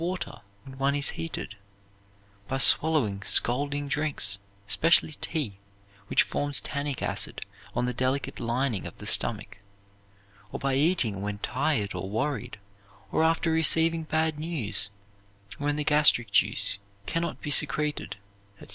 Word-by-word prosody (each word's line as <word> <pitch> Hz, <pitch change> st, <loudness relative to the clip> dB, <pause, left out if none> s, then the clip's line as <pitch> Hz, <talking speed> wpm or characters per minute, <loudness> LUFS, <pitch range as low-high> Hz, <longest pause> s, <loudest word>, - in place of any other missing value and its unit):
water 170 Hz, -9 st, -5 dB, 0.2 s
when 135 Hz, -, -11 dB
one 140 Hz, +1 st, +1 dB
is 145 Hz, -1 st, +3 dB
heated, 165 Hz, -10 st, -6 dB, 0.9 s
by 135 Hz, -, -2 dB
swallowing 130 Hz, -6 st, +4 dB
scalding 140 Hz, +7 st, +2 dB
drinks, 140 Hz, -9 st, +1 dB, 0.3 s
especially 165 Hz, +8 st, +3 dB
tea, 150 Hz, -11 st, -3 dB, 0.5 s
which -, -, +3 dB
forms 145 Hz, -1 st, +4 dB
tannic 140 Hz, -2 st, -4 dB
acid -, -, -1 dB, 0.4 s
on -, -, 0 dB
the 125 Hz, -, -2 dB
delicate 130 Hz, +3 st, -2 dB
lining 120 Hz, -3 st, -2 dB
of -, -, -12 dB
the -, -, -10 dB
stomach; 105 Hz, -2 st, +1 dB, 0.9 s
or -, -, -6 dB
by 135 Hz, -1 st, -1 dB
eating 135 Hz, -, +2 dB
when 105 Hz, 0 st, -4 dB
tired 125 Hz, -2 st, -1 dB
or 95 Hz, -, -5 dB
worried, 115 Hz, +1 st, -3 dB, 0.5 s
or -, -, +1 dB
after 165 Hz, 0 st, +1 dB
receiving 160 Hz, +1 st, +3 dB
bad 160 Hz, -1 st, -2 dB
news, 130 Hz, -, -1 dB, 0.7 s
when 145 Hz, 0 st, -1 dB
the 150 Hz, -, -2 dB
gastric 145 Hz, -7 st, +3 dB
juice 100 Hz, +1 st, +2 dB, 0.3 s
can 165 Hz, -, -2 dB
not 170 Hz, -, -4 dB
be 150 Hz, -, -5 dB
secreted, 150 Hz, +2 st, +1 dB, 0.4 s
etc. -, -, -15 dB
140 Hz, 140 wpm, -26 LUFS, 115-155 Hz, 0.9 s, swallowing